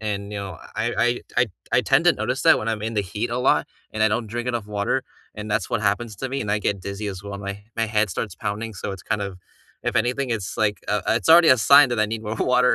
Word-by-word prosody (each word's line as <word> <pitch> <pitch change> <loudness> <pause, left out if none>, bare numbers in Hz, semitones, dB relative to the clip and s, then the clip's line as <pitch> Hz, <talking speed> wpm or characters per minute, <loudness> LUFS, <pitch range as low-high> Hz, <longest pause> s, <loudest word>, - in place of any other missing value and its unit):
and, 105 -1 -4
you 105 - -3
know, 95 -4 -6 0.2
I 110 +1 -1
I - - +4
I - - +4
t - - -9
I 120 - +5
t 110 - -13 0.2
I 125 - +5
tend 135 +5 +3
to 175 - +7
notice 125 +4 -2
that - - +6
when 110 - -3
I'm 110 -1 -2
in 115 +1 -3
the 105 - +2
heat 105 +5 -4
a 120 - -1
lot 125 - +2 0.3
and 110 - -1
I 110 - +5
don't 115 +2 -1
drink 120 +3 -4
enough 120 -4 -2
water, 105 +5 -1 0.3
and 105 0 -6
that's 110 +1 -1
what 115 - 0
happens 105 +1 -1
to 130 +7 -4
me, 135 +1 -3
and 105 - -3
I 105 - +2
get 100 -2 -1
dizzy 100 +2 -5
as 95 -2 -5
well, 100 -1 -7
and 100 - -7
my 100 +1 -5
my 115 0 +1
head 105 -1 +1
starts 95 +2 -4
pounding, 105 +4 -4
so 95 - -5
it's 95 -3 -7
kind 105 -2 -1
of 95 -2 -6 0.4
if - - -1
anything, 125 +3 0
it's, 105 -6 -3
like, 105 -1 0
uh 105 -1 0
it's 115 - +1
already 165 0 +8
a 130 - +7
sign 140 +4 +7
that 120 - -1
I 110 - +3
need 110 +1 -4
more 105 +1 -3
water. 125 0 +3
110 Hz, 295 wpm, -23 LUFS, 100-120 Hz, 0.4 s, already